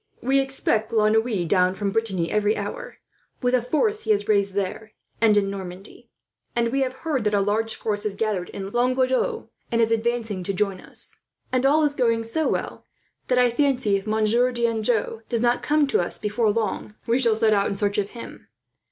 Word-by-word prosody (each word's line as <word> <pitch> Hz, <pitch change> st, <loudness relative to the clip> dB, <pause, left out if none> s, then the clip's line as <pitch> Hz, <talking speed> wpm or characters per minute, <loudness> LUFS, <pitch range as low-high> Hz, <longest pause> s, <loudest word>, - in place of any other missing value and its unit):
"We 270 Hz, +2 st, +2 dB
expect 270 Hz, -5 st, 0 dB
La 215 Hz, -2 st, +3 dB
Noue 220 Hz, -4 st, +1 dB
down 180 Hz, +1 st, +2 dB
from 200 Hz, 0 st, -2 dB
Brittany 195 Hz, -6 st, -1 dB
every 210 Hz, 0 st, +1 dB
hour, 205 Hz, 0 st, -6 dB, 0.5 s
with 245 Hz, 0 st, +2 dB
a 250 Hz, -, +4 dB
force 410 Hz, -, 0 dB
he -, -, -7 dB
has 205 Hz, -1 st, +2 dB
raised 200 Hz, -2 st, +2 dB
there 205 Hz, +2 st, -3 dB, 0.3 s
and 215 Hz, -2 st, +5 dB
in 195 Hz, -1 st, +1 dB
Normandy; 190 Hz, 0 st, -9 dB, 0.5 s
and 235 Hz, -1 st, +1 dB
we 270 Hz, +3 st, 0 dB
have 260 Hz, -1 st, 0 dB
heard 285 Hz, -7 st, 0 dB
that 210 Hz, -1 st, +1 dB
a -, -, +3 dB
large 215 Hz, +3 st, 0 dB
force 205 Hz, -2 st, -2 dB
has 210 Hz, -2 st, -2 dB
gathered 200 Hz, -4 st, -2 dB
in 195 Hz, 0 st, -6 dB
Languedoc, 255 Hz, -, 0 dB, 0.2 s
and 230 Hz, -, +1 dB
is 225 Hz, -1 st, +3 dB
advancing 225 Hz, -3 st, -1 dB
to 190 Hz, +2 st, -2 dB
join 195 Hz, -1 st, 0 dB
us; -, -, -8 dB, 0.3 s
and 255 Hz, +1 st, +2 dB
all 305 Hz, +3 st, +4 dB
is 295 Hz, -1 st, +2 dB
going 230 Hz, -4 st, +1 dB
so 300 Hz, +8 st, -1 dB
well -, -, -3 dB, 0.4 s
that 250 Hz, -, +2 dB
I 250 Hz, -1 st, +4 dB
fancy, 255 Hz, -5 st, +1 dB
if 195 Hz, +2 st, -3 dB
Monsieur 220 Hz, +3 st, +2 dB
d'Anjou 230 Hz, -1 st, 0 dB
does 235 Hz, -, 0 dB
not 240 Hz, 0 st, +2 dB
come 300 Hz, 0 st, +2 dB
to 275 Hz, -, +1 dB
us 175 Hz, -, -2 dB
before 210 Hz, +1 st, 0 dB
long, 215 Hz, -1 st, -2 dB
we 235 Hz, +2 st, +2 dB
shall 230 Hz, -4 st, +3 dB
set 220 Hz, -1 st, +3 dB
out 200 Hz, -1 st, +2 dB
in -, -, -2 dB
search 205 Hz, +1 st, 0 dB
of 200 Hz, 0 st, -2 dB
him. 235 Hz, -, -10 dB
220 Hz, 205 wpm, -24 LUFS, 205-245 Hz, 0.5 s, and